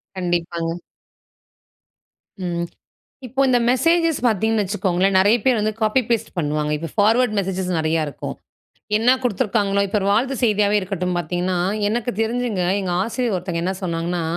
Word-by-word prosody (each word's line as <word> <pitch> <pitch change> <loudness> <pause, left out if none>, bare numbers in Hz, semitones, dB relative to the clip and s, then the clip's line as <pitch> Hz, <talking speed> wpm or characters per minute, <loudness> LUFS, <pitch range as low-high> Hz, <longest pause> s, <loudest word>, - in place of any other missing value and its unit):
கண்டிப்பாங்க. 170 -1 -2 1.7
ம். 170 0 -2 0.6
இப்போ 265 +3 -3
இந்த 245 -1 +4
மெசேஜஸ் 330 +4 +2
பார்த்தீங்கன்னு 220 0 +2
வச்சுக்கோங்களேன், 190 -1 +1
நெறைய 205 +5 +5
பேர் 250 -4 +3
வந்து 215 +1 0
காப்பி 215 +4 +3
பேஸ்ட் 230 -1 0
பண்ணுவாங்க. 150 -1 -1
இப்ப 165 - -5
ஃபார்வர்ட் 220 +2 +3
மெசேஜஸ் 190 -1 -2
நெறைய 160 0 0
இருக்கும். 145 - -6 0.6
என்னா 235 +4 +4
குடுத்துருக்காங்களோ 200 -3 +1
இப்ப 205 +2 0
ஒரு 195 - -2
வாழ்த்து 255 +6 +1
செய்தியாவே 210 -2 +3
இருக்கட்டும் 180 -2 -2
பார்த்தீங்கன்னா, 175 +2 -1 0.3
எனக்கு 235 +3 -1
தெரிஞ்சுங்க 225 -4 -1 0.2
எங்க 185 -2 -3
ஆசிரியர் 230 -1 -1
ஒருத்தங்க 175 -2 -3
என்ன 190 - 0
சொன்னாங்கன்னா, 170 0 -2
200 Hz, 140 wpm, -21 LUFS, 175-225 Hz, 1.7 s, நெறைய